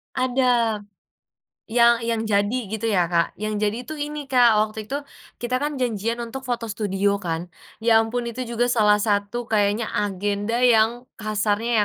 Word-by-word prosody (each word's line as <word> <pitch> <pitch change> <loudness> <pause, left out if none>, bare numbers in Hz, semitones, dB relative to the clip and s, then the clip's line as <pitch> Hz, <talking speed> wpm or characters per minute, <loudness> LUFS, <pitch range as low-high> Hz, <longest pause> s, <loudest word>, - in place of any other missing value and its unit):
Ada. 250 -3 +2 1.0
Yang 235 0 +6
yang 230 -1 0
jadi, 205 +4 +1
gitu 220 +2 -3
ya, 180 -4 +2
Kak. 170 -1 +1
Yang 215 0 -2
jadi 210 +2 -1
itu, 310 - -5
ini, 295 +1 -4
Kak. 240 -4 +5
Waktu 215 0 -8
itu, 275 +5 -2 0.4
kita 245 +1 -1
kan 295 0 -1
janjian 230 -1 -1
untuk 260 +3 -6
foto 235 -2 -2
studio, 200 -1 0
kan. 170 0 -3 0.3
Ya 225 -1 +5
ampun 235 +2 -3
itu 255 +2 -5
juga 235 +1 0
salah 210 -3 +4
satu 205 +3 -1
kayaknya 210 +1 +1
agenda, 205 +2 -1
yang 240 +1 +3
kasarnya, 215 +1 0
225 Hz, 155 wpm, -23 LUFS, 205-240 Hz, 1.0 s, Yang